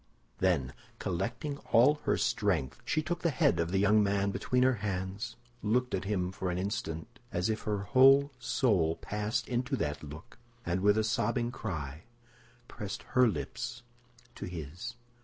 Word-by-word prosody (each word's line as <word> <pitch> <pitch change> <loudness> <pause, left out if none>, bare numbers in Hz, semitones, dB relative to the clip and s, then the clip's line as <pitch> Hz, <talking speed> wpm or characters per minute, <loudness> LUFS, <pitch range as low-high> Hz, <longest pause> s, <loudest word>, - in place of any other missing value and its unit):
Then, 80 -9 +1 0.2
collecting 120 - -3
all 145 +6 +6
her - - +2
strength, 85 - 0
she 155 - 0
took 175 +3 -2
the 170 - +1
head 85 - +2
of 85 0 +1
the 95 - 0
young 105 +2 +5
man 100 0 +1
between 125 +5 +1
her 130 -2 +3
hands, 95 0 -3 0.3
looked 125 +4 +1
at 95 0 -1
him 95 -3 0
for 95 -1 -3
an 90 - -1
instant 95 +2 -4
as 90 +5 0
if 110 - -4
her 100 -2 0
whole 135 +5 +6
soul 100 -9 +2
passed 105 +3 -2
into 120 0 -1
that 75 0 -2
look, 75 +12 -10 0.3
and 90 +1 0
with 105 +2 +4
a 110 - +3
sobbing 120 +2 0
cry 80 - -5 0.6
pressed 100 -2 -6
her 125 -1 +6
lips 100 - -4 0.5
to - - -6
his. 90 - -6
105 Hz, 160 wpm, -31 LUFS, 90-120 Hz, 0.6 s, all